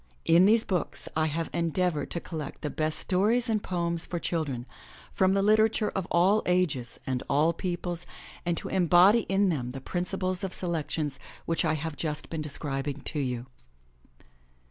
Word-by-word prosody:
In 175 +3 +6
these 225 +1 +5
books 180 -4 -2
I 155 0 +2
have 165 +2 -3
endeavored 170 -1 0
to 170 - -2
collect 155 -5 -7
the 150 - -2
best 155 -1 -1
stories 215 +6 +2
and 220 -2 +1
poems 170 -3 -1
for 175 - -4
children 150 -8 -2 0.5
from 190 0 +3
the 195 - +2
literature 215 +1 +3
of 190 -2 -3
all 190 +5 +4
ages 165 -10 0
and 130 -1 -1
all 155 +4 +3
peoples 175 -1 -3 0.4
and 175 -1 -1
to - - -4
embody 190 +4 +5
in 195 0 +3
them 125 -7 -2
the 135 - -5
principles 185 +4 -1
of 190 -2 -3
selections 155 -5 -2 0.3
which 165 - +1
I 155 -1 +1
have 155 0 -4
just 150 -1 -4
been 160 -2 -2
describing 145 -1 -3
to 150 - -1
you. 125 -3 -2
170 Hz, 165 wpm, -28 LUFS, 150-185 Hz, 0.5 s, In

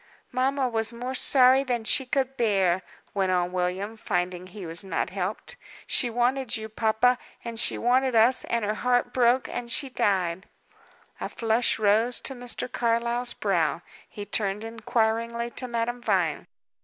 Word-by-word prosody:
"Mamma 265 +1 +1
was 225 -1 -1
more 245 +2 -5
sorry 260 0 +5
than 245 -4 -1
she 260 +4 +1
could 270 0 0
bear," 195 -7 +2 0.3
went 190 -2 +1
on 180 -1 +1
William, 185 +4 -2
finding 180 -3 -2
he 185 0 -9
was 165 +3 -5
not 195 - -2
helped. 190 +2 -3 0.3
"She 245 - +2
wanted 245 +1 0
you, 220 0 -7
papa, 225 +3 +2 0.3
and 230 -1 -5
she - - +2
wanted 255 +1 +2
us, 230 +3 +4
and 235 -2 -1
her 210 - 0
heart 245 +2 +1
broke, 250 0 +3
and 240 -1 -5
she 275 +1 -2
died." 190 -4 0 0.7
A - - -4
flush 230 +1 +1
rose 220 +3 +2
to 270 - -3
Mr. 245 -1 -3
Carlyle's 235 0 0
brow. 175 -4 0 0.3
He 205 - -7
turned 205 0 -1
inquiringly 230 +1 -1
to 255 - -4
Madame 240 +1 -2
Vine. - - 0
230 Hz, 155 wpm, -26 LUFS, 205-245 Hz, 0.7 s, sorry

